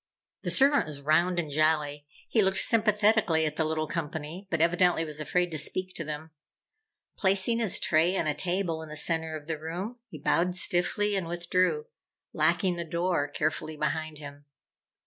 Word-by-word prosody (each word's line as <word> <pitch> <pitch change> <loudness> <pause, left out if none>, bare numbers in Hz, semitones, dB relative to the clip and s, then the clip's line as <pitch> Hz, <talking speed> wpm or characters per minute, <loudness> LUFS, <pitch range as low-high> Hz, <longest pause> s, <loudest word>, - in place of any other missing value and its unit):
The - - -3
servant 280 - +4
was 150 -2 -7
round 165 +5 +2
and 155 -4 -3
jolly. 150 -1 +1 0.2
He 225 - +2
looked 190 -1 +2
sympathetically 210 -6 +3
at 155 -1 -2
the 160 - 0
little 155 0 -1
company, 160 +3 -5
but 170 - -1
evidently 175 0 +3
was 155 -1 -6
afraid 175 +3 0
to 155 - -2
speak 185 +5 -2
to 165 - -4
them. 155 +1 -7 0.9
Placing 195 +4 +3
his 220 -5 +2
tray 170 +4 +2
on - - 0
a 150 - +1
table 175 0 -1
in 160 - -9
the 155 - -6
center 160 0 0
of 150 -2 -8
the 160 -1 -4
room, 180 +10 -5
he 155 - -9
bowed 180 +5 +1
stiffly 190 +3 +1
and 190 -4 -2
withdrew, 180 - 0 0.5
locking 185 -3 +1
the 170 - -3
door 170 -2 -1
carefully 155 +1 -3
behind 155 0 -2
him. 145 -1 -11
165 Hz, 175 wpm, -28 LUFS, 155-185 Hz, 0.9 s, servant